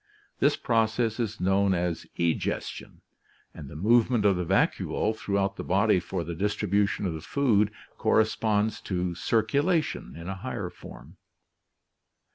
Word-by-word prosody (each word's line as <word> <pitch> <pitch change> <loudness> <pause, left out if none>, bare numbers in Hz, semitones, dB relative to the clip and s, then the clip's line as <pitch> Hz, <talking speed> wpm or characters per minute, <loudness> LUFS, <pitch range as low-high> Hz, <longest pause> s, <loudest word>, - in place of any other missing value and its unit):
This - - +3
process 115 0 +1
is 110 -2 -2
known 95 +1 +2
as 85 -1 -2
egestion, 85 -2 -2 0.5
and 75 -4 -9
the - - -10
movement 115 +5 +3
of 100 -2 +5
the 90 - -1
vacuole 110 +5 +1
throughout 100 -2 -1
the - - -4
body 100 +1 +3
for 90 0 -4
the 85 +1 -5
distribution 100 +2 0
of 90 - -1
the 80 - -6
food 110 - +2 0.3
corresponds 110 -1 +1
to 90 -2 -1
circulation 140 - 0
in 85 +1 -8
a 95 0 -4
higher - - -5
form. - - -13
100 Hz, 135 wpm, -27 LUFS, 90-110 Hz, 0.5 s, of